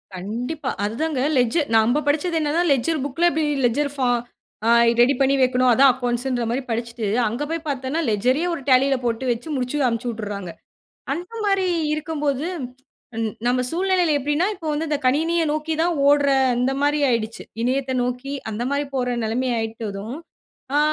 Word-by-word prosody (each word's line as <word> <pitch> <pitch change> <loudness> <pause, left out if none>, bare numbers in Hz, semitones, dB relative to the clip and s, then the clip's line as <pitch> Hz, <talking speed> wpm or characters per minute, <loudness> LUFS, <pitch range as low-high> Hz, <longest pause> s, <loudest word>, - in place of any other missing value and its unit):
கண்டிப்பா. 245 - -4
அதுதாங்க 255 +6 -1 0.2
லெட்ஜர் 250 +5 +2
நம்ப 240 +7 +3
படிச்சது 325 +3 +1
என்னன்னா 310 +2 +1
லெட்ஜர் 280 +3 +1
புக்குல 285 +5 0
பி 315 - +2
எப்டி 290 -2 -1
லெட்ஜர் 285 +4 +1
ஃபார்ம் 245 -3 +1 0.5
ஆ - - +4 0.3
ரெடி 250 +4 +6
பண்ணி 275 0 +3
வைக்கணும் 255 0 +3
அதுதான் 265 +2 +6
அக்கவுண்ட்ஸ்ன்ற 245 -1 -1
மாரி 250 +3 -1
படிச்சுட்டு. 235 0 -3 0.2
அங்க 240 +7 -3
போய் 330 -1 -3
பார்த்தன்னா 270 +3 -2
லெட்ஜரயே 255 - +1
ஒரு 325 - -4
டேலியில 270 +1 +4
போட்டு 235 +2 -1
வச்சு 235 +5 -4
முடிச்சு 255 +2 -2
அனும்ச்சிட்டுறாங்க. 215 -6 -4 0.6
அந்த 350 +7 -6
மாரி 390 -2 +2 0.3
இருக்கும்போது 300 -2 -2 1.0
நம்ம 250 +1 +2
சூழ்நிலையில 360 -2 +2
எப்டின்னா 295 +6 +1
இப்போ 330 -4 -8
வந்து 310 +2 -2
இந்த 295 - +1
கணினிய 325 +6 +2
நோக்கி 310 +1 -2
தான் 345 +1 +2
ஓடுற 285 -1 +4 0.3
அந்த 250 +2 +1
மாரி 295 +1 +2
ஆயிடுச்சு. 225 -1 -2 0.2
இணையத்த 260 +2 0
நோக்கி 250 +3 -3 0.2
அந்த 220 +3 -3
மாரி 285 +1 0
போற 250 -1 0
நெலைமை 245 +4 -1
ஆயிட்டதும். 220 +1 -5 0.6
ஆ - - +4
265 Hz, 155 wpm, -22 LUFS, 240-300 Hz, 1.0 s, ரெடி